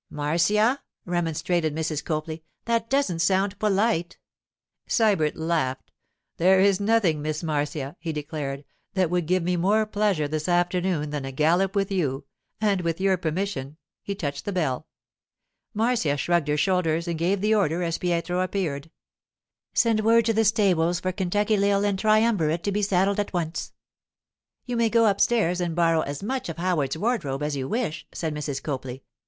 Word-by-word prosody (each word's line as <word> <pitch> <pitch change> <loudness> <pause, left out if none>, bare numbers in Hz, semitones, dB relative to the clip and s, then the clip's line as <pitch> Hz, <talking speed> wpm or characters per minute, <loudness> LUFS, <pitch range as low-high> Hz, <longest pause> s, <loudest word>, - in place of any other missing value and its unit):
'Marcia,' 205 - +1 0.2
remonstrated 170 -2 -1
Mrs. 155 -2 -2
Copley, 155 0 -4 0.2
'that 230 -1 0
doesn't 270 -12 +1
sound 195 +3 +1
polite.' 205 -4 +1 0.7
Sybert 200 -10 +2
laughed. 160 -6 -2 0.5
'There 185 +3 +5
is 195 -1 +4
nothing, 200 -7 +2
Miss 155 +2 -3
Marcia,' 150 -2 -2
he 165 -1 -4
declared, 145 -2 -5 0.3
'that 185 -3 +1
would 175 -3 0
give 185 0 +1
me 180 +1 0
more 205 +5 +2
pleasure 205 -7 0
this 155 +3 -3
afternoon 175 -3 +1
than 145 -2 -3
a 135 - -5
gallop 175 +8 +2
with 200 0 0
you; 140 -7 -1 0.3
and 205 -3 +1
with 165 0 -2
your 190 0 +3
permission——' 160 -4 -3 0.2
he 200 - -4
touched 145 -6 -4
the 205 - -2
bell. 155 -9 -1 0.9
Marcia 220 -10 +1
shrugged 170 0 +1
her 150 0 +1
shoulders 170 0 +1
and 170 -2 -2
gave 185 +4 +1
the 210 +3 +2
order 180 -4 +1
as 165 -1 -2
Pietro 175 0 -1
appeared. 180 -6 -2 0.9
'Send 230 -2 +3
word 225 +1 +4
to 225 - +2
the 225 +1 +2
stables 180 -6 +2
for 185 - -2
Kentucky 205 +3 0
Lil 200 0 +2
and 200 -2 0
Triumvirate 215 -7 +2
to 200 - 0
be 205 +1 0
saddled 195 0 +2
at 205 - -2
once.' 165 -2 -3 0.9
'You 245 -2 -3
may 230 -1 +3
go 230 +1 +4
upstairs 200 -3 +2
and 170 -2 -2
borrow 165 -2 +3
as 145 +4 -5
much 255 -1 -3
of 165 - -6
Howard's 165 -5 0
wardrobe 160 - -1
as 150 -1 -1
you 130 -1 -3
wish,' 220 - -3
said 160 -2 -3
Mrs. 145 -2 -4
Copley. 130 -3 -5
175 Hz, 165 wpm, -25 LUFS, 155-200 Hz, 0.9 s, There